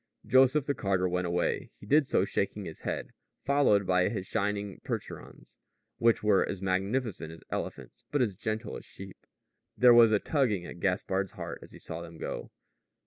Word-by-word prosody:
Joseph 130 +2 +4
the 145 - 0
carter 95 -6 0
went 90 0 -1
away. 85 0 -1
He - - -12
did 145 +5 +4
so 95 - +2
shaking 100 0 -2
his 80 - -8
head, - - -4 0.3
followed 135 -8 +3
by 90 0 +3
his 100 -5 -4
shining 100 -1 -2
Percherons, - - -7 0.4
which 115 -2 +3
were 105 -2 +4
as 95 - -4
majestic 95 +1 -1
as 80 0 -12
elephants, 65 -3 -5
but 145 - 0
as 110 -7 +1
gentle 110 +3 -3
as - - -11
sheep. 95 -1 -12 0.5
There 125 -1 +7
was 115 -2 +7
a 105 - +5
tugging 110 - 0
at 90 - -9
Gaspard's 95 +1 -1
heart - - -6
as - - -13
he - - -12
saw 80 +1 -7
them 85 -1 -10
go. - - -5
100 Hz, 180 wpm, -29 LUFS, 90-115 Hz, 0.5 s, There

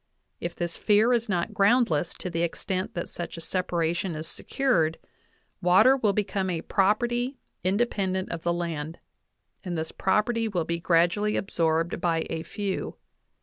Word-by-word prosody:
If 170 0 -4
this 170 -1 -3
fear 215 +3 +4
is 235 -1 0
not 175 -4 -1
groundless 200 - +3
to 180 - -5
the 165 0 -1
extent 185 +2 -2
that 170 - -3
such 175 -1 -6
a - - -5
separation 175 0 -1
is 155 +1 -4
secured, 165 - 0 0.6
water 195 +9 +6
will 225 -6 +2
be 210 +1 +1
come 195 -1 -2
a 170 -3 -1
property 240 +6 +1 0.3
independent 190 -2 0
of 170 - -4
the 170 - 0
land, 165 -2 -3 0.7
and 175 -4 -3
this 160 0 -3
property 225 +4 +1
will 180 -6 -1
be 170 0 -2
gradually 175 +5 +2
absorbed 165 -2 0
by 165 -2 +1
a 160 - -2
few. 200 +3 -4
180 Hz, 155 wpm, -27 LUFS, 170-210 Hz, 0.7 s, water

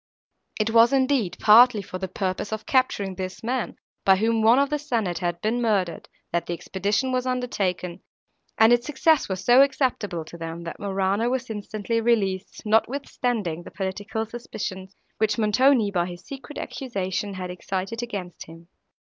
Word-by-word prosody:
It 215 +1 +1
was, 230 +2 +6
indeed, 260 -7 +1
partly 220 0 +7
for 185 -1 -7
the 190 - -3
purpose 185 +2 -3
of 220 0 -4
capturing 230 -7 +1
this 185 +2 -6
man, 245 +1 -2 0.3
by 190 - +6
whom 225 +3 +1
one 225 +3 +6
of 280 +1 +2
the 295 - 0
senate 225 - -1
had 175 -1 -2
been 230 +3 0
murdered, 195 -7 0 0.2
that 170 -1 -1
the 175 - -2
expedition 205 +9 -1
was 255 0 -1
undertaken, 190 -8 -2 0.6
and 220 +2 +6
its 240 +1 +1
success 300 -1 +2
was 190 -1 -4
so 245 +2 +7
acceptable 240 - 0
to 170 +2 -11
them, 165 +1 -6
that 170 - -7
Morano 195 +3 0
was 255 -2 -2
instantly 215 +2 -3
released, 200 -5 0
notwithstanding 220 - 0
the - - -10
political 205 +3 -4
suspicions, 200 -4 -7 0.2
which 215 -1 +1
Montoni, 225 +1 +3
by 175 -2 0
his 175 -1 -9
secret 275 +1 -9
accusation, 200 -5 -4
had 185 -1 -5
excited 190 +5 -4
against 200 -7 -6
him. 165 +1 -14
210 Hz, 165 wpm, -24 LUFS, 185-240 Hz, 0.6 s, partly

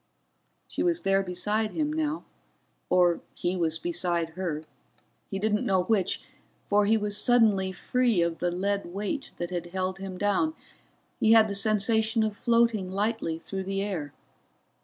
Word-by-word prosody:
She - - -4
was 345 -1 +1
there 195 0 +2
beside 210 +4 -1
him 300 -1 -1
now 310 0 -1 0.7
or 175 -2 +3
he 175 +1 -1
was 165 -3 +1
beside 170 0 -1
her 165 -3 -3 0.7
he 195 - -3
didn't 210 +1 0
know 190 -2 +2
which, 200 -2 0 0.4
for 205 0 +3
he 225 +1 +4
was 205 -1 -1
suddenly 210 -4 +3
free 235 0 +1
of 170 -1 -2
the 175 - +1
great 200 +3 -1
weight 205 - -4
that 175 +1 -4 0.2
held 185 +1 -3
him 190 -1 -6
down, 205 - +1 0.6
he 220 0 +5
had 220 -1 +7
the 200 - -3
sensation 220 +2 +2
of 215 -1 -1
floating 230 -4 +2
lightly 200 -4 -1
through 190 +3 -6
the 195 +1 -1
air. 170 -9 -4
200 Hz, 155 wpm, -27 LUFS, 180-220 Hz, 0.7 s, had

